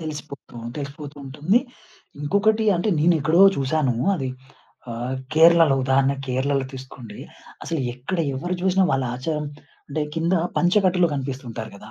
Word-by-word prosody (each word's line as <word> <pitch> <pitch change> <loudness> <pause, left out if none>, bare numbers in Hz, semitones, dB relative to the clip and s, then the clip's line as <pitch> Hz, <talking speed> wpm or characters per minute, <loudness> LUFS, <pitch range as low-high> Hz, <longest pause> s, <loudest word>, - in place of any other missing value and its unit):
తెలిసిపోతు 150 -5 -8 0.2
తెలిసిపోతూ 145 0 -7
ఉంటుంది. 150 - +1 0.6
ఇంకొకటి 210 +8 +2
అంటే 175 +5 -1
నేనెక్కడో 165 +1 +3 0.2
చూసాను 135 -1 0 0.2
అది. 135 -7 -3 0.6
ఆహ్, 120 +3 -3 0.2
కేరళలో 165 -2 +6
ఉదాహరణ 135 +1 +3
కేరళలో 130 +1 0
తీసుకోండి. 130 -4 -10 0.5
అసలు 165 -4 -2
ఎక్కడ 135 +9 -4 0.2
ఎవరు 175 +7 -3
జూసినా 190 +1 +3
వాళ్ళ 135 -1 +1
ఆచారం 150 +3 -3 0.4
అంటే 150 +2 -3
కింద 165 +2 0 0.2
పంచ 175 +1 +2
కట్టలు 180 -1 +3
కనిపిస్తుంటారు 130 -5 -5
గదా! 105 +2 -13
145 Hz, 125 wpm, -23 LUFS, 130-170 Hz, 0.6 s, కేరళలో